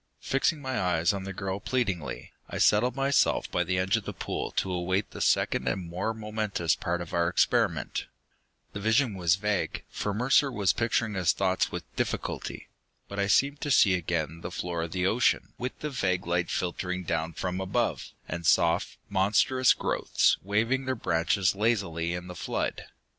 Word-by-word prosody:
Fixing 140 +2 0
my 130 -4 -1
eyes 85 -1 +2
on 95 -1 -4
the 95 - -4
girl 95 0 -3
pleadingly, 100 - -2 0.2
I - - -4
settled 120 +4 +3
myself 135 0 +2
by 90 - +1
the 90 +1 -1
edge 95 +1 +2
of - - -5
the - - -4
pool - - -3
to 95 - -1
await 95 +3 -1
the - - -7
second - - +2
and 90 -3 -1
more 90 +6 -2
momentous 105 -6 -1
part 85 -1 -2
of 85 - -8
our 85 0 +2
experiment. - - +1 0.7
The 105 - -4
vision 110 +3 +2
was 90 -2 +3
vague, 105 0 -1
for 105 - -2
Mercer 130 +6 +3
was 100 -6 +2
picturing 115 -1 0
his 90 -4 +2
thoughts 95 0 +1
with - - -4
difficulty. - - -3 0.4
But 100 - -6
I 100 - +1
seemed 140 +8 +2
to 145 - -2
see 100 -7 +5
again 85 -2 -2
the 85 - -5
floor 85 -1 -3
of 80 0 -4
the 90 +1 -1
ocean, 115 +6 +2
with 125 +1 -4
the 150 - -3
vague 90 -8 0
light 85 0 0
filtering 90 +1 -2
down 80 -1 -2
from 90 +2 -3
above, 115 +5 -1 0.2
and 85 +1 -4
soft, 85 +1 +2
monstrous 105 +6 +3
growths - - +2
waving 115 +7 0
their 130 0 0
branches 90 -2 +1
lazily 95 -6 0
in 90 0 -6
the 90 - -7
flood. - - -3
95 Hz, 180 wpm, -28 LUFS, 85-110 Hz, 0.7 s, see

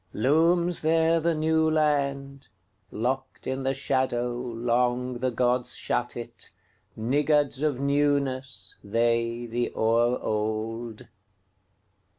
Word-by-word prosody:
Looms 165 +7 +2
there 165 +1 +3
the 165 0 +1
New 160 +1 +2
Land:Locked 140 - -3
in 130 +1 -2
the 135 - 0
shadowLong 125 -1 -1
the 130 +1 0
gods 125 +1 0
shut 120 0 -2
it, 120 0 -8 0.5
Niggards 145 +4 +1
of 150 -3 +1
newnessThey, 120 -4 -1
the 120 +1 -2
o'er 115 +2 +2
old. 110 +1 -3
125 Hz, 90 wpm, -26 LUFS, 115-145 Hz, 0.5 s, there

